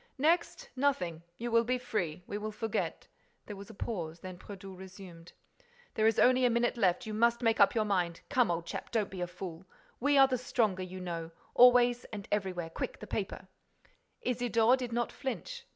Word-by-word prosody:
"Next? 340 - +1
Nothing.—You 180 - -2
will 230 0 +5
be 250 +2 0
free.—We 200 -5 -3
will 215 +1 -4
forget—" 220 +1 -3 0.4
There 210 - -7
was 200 0 -10
a - - -11
pause. 170 -7 -4
Then 185 +1 -8
Brédoux 195 -1 -9
resumed: 185 -2 -11 0.6
"There 215 0 +3
is 225 - +2
only 255 +1 +5
a 250 - +5
minute 235 +1 +1
left. 185 -7 +2
You 215 - -5
must 235 +2 +2
make 225 -1 +2
up 200 - +6
your 220 -1 +2
mind. 180 -5 0
Come, 255 -6 +2
old 170 -1 -1
chap, - - -6
don't 220 -4 -1
be 185 -2 -6
a 175 - -1
fool.—We 185 - -3
are 270 0 +8
the 255 -2 -1
stronger, 230 -7 0
you 185 0 -6
know, 170 -2 -4 0.2
always 245 0 +6
and 205 -3 -8
everywhere.—Quick, 185 - -2
the - - -8
paper—" - - -4 0.8
Isidore 240 -1 +3
did 250 -2 -5
not 240 +1 -1
flinch. 475 - -5
215 Hz, 180 wpm, -31 LUFS, 185-245 Hz, 0.8 s, are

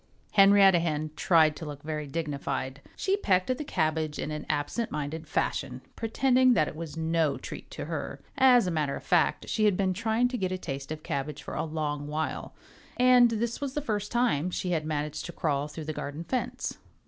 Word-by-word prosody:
Henrietta 195 -2 +7
Hen 155 -2 -1
tried 160 -3 +4
to 155 - -8
look 145 -2 -7
very 150 -1 -4
dignified. 140 -3 -3
She 390 +1 0
pecked 185 - +2
at 255 - -2
the - - -2
cabbage 155 - -1
in 155 - -3
an 150 0 -5
absent 155 +10 -1
minded 150 0 -4
fashion, - - -2
pretending 255 +2 +3
that 155 - +3
it - - -6
was 160 0 -7
no 160 -2 +1
treat - - -8
to - - -6
her. - - -4 0.2
As 250 -4 +6
a 180 - -1
matter 150 -4 0
of - - -8
fact, - - +2
she 215 - +1
had 205 -3 +3
been 190 -2 +1
trying 225 +4 +1
to 250 -1 -3
get 185 -1 -1
a 185 - -1
taste 135 -5 -6
of 155 0 -5
cabbage 140 +1 -4
for - - -7
a - - -1
long 150 -2 -3
while. 155 +1 -3 0.4
And 250 -1 +6
this 230 +3 -2
was 275 -2 -3
the - - +1
first 210 -6 -2
time 235 -10 +1
she 180 0 -2
had 160 -3 0
managed 150 -1 -3
to 175 - -8
crawl 145 -4 -1
through 155 +1 -8
the 155 - -3
garden 145 +2 -5
fence. 255 +8 -3
165 Hz, 205 wpm, -28 LUFS, 150-215 Hz, 0.4 s, Henrietta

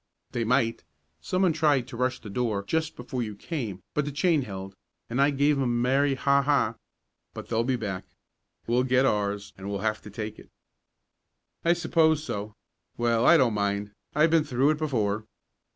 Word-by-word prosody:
"They 120 - -1
might. 115 -1 +1 0.4
Someone 185 - +1
tried 145 -5 +2
to 125 - -8
rush 125 +1 0
the 105 - -10
door 110 -3 -1
just 160 +8 -1
before 125 +1 -4
you 105 -3 -4
came, 105 - -5
but 150 - +1
the 145 - -4
chain 155 +2 +2
held 95 -4 -7 0.4
and 125 +3 +1
I 140 - +5
gave 145 +1 +2
'em - - 0
the 130 - +1
merry 130 +4 +2
ha 140 +1 +3
ha! 140 -5 +2 0.6
But - - -8
they'll 115 0 +1
be 130 +2 +1
back 100 -6 -4 0.6
we'll 120 +2 +2
get 130 +1 +3
ours 100 -3 -1
and 100 +1 -6
we'll 100 -1 -3
have 110 0 0
to 105 - -10
take 105 0 -6
it." - - -15 1.1
"I 170 - +4
suppose 160 -2 +2
so. 105 -6 -5 0.4
Well, 120 0 +2
I 170 - +8
don't 125 -6 +3
mind. 100 0 -1 0.2
I've 155 +2 +4
been 165 -2 +4
through 135 +1 +2
it 155 - -2
before." 110 -8 -1
125 Hz, 185 wpm, -27 LUFS, 105-145 Hz, 1.1 s, I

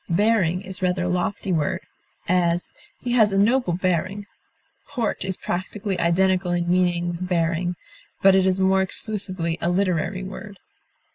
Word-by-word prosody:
Bearing 185 -1 +2
is 190 0 -3
rather 180 0 +1
a - - -1
lofty 185 +2 -1
word; 155 -3 0 0.5
as, 175 -1 +1 0.3
he 245 - -3
has 220 -4 +4
a 195 - 0
noble 220 -1 +3
bearing; 185 +3 -1 0.6
port 245 -10 -2
is 190 -1 -3
practically 190 +1 -3
identical 180 +1 +2
in 175 0 -1
meaning 175 -1 +2
with 175 +1 -4
bearing, 175 0 0 0.5
but 195 0 +7
is 190 0 +3
more 190 0 +3
exclusively 185 -4 -3
a 170 - +1
literary 185 0 0
word. 195 +1 -8
185 Hz, 145 wpm, -23 LUFS, 175-195 Hz, 0.6 s, but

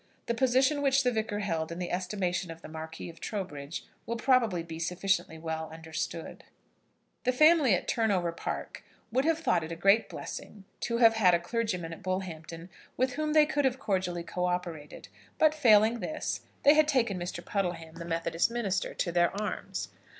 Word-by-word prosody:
The 235 - 0
position 260 +4 +3
which 275 -1 +3
the 250 - +2
Vicar 220 -2 -2
held 165 -5 -2
in 170 - -5
the 180 -1 -4
estimation 180 -1 -2
of 165 0 -9
the - - -7
Marquis 160 +1 -7
of 165 -1 -11
Trowbridge 170 -6 -5 0.2
will 235 - -1
probably 230 -8 +2
be 165 -1 -8
sufficiently 180 0 0
well 160 0 -4
understood. 160 0 -5 0.8
The 255 - +3
family 305 - +5
at - - -4
Turnover 195 -7 +1
Park 165 - -5 0.3
would 260 +4 +1
have 325 0 +3
thought 315 - +1
it 160 - -6
a - - -3
great 195 +6 +4
blessing 205 -2 -8 0.2
to 235 - -1
have 230 -2 +7
had 190 -6 +5
a - - +1
clergyman 180 -3 -2
at - - -10
Bullhampton 175 -2 -5 0.3
with 255 0 +1
whom 305 +2 -1
they 305 -1 +7
could 295 -1 0
have 265 -1 +2
cordially 185 -8 -1
co 180 +1 -2
operated; 175 -4 -4 0.3
but, 310 -1 +5
failing 230 -5 +5
this, 310 +4 -3 0.2
they 290 - +8
had 310 -1 +4
taken 235 -10 +1
Mr. 175 +1 -5
Puddleham, 170 -4 -3
the - - -5
Methodist 165 +2 0
minister, 205 -6 -2
to 175 - -1
their 175 +3 +2
arms. 210 - -4
190 Hz, 180 wpm, -29 LUFS, 170-240 Hz, 0.8 s, they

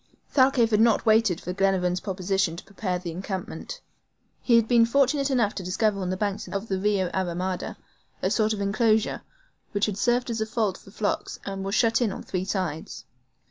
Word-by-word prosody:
Thalcave 260 -4 +4
had 210 0 +4
not 230 0 +3
waited 220 -5 +4
for 180 - -5
Glenarvan's 185 -2 +1
proposition 190 -2 -1
to 170 - -9
prepare 195 -2 -3
an 180 0 -5
encampment. 190 - -5 0.6
He 240 - +3
had 230 -1 +4
been 235 -1 +5
fortunate 275 +3 +2
enough 235 -6 +2
to 190 - -5
discover 200 +3 0
on 180 - -2
the 185 - -2
banks 205 +1 -2
of 200 +3 -4
the 190 -1 0
rio 195 -3 +1
a 190 - +1
ramada, 180 +1 -3 0.4
a - - 0
sort 215 -1 +2
of 210 -2 -2
enclosure, 215 +2 +1 0.5
which 205 0 +2
had 205 -2 -3
served 245 0 +1
as 225 -1 -2
a 220 - -1
fold 215 -4 -1
for - - -16
flocks, 205 0 -2
and 195 -1 -4
was 195 +2 -2
shut 230 0 +3
in 225 -4 +2
on - - -7
three 185 -1 -3
sides. 180 -6 -4
200 Hz, 200 wpm, -26 LUFS, 185-225 Hz, 0.6 s, been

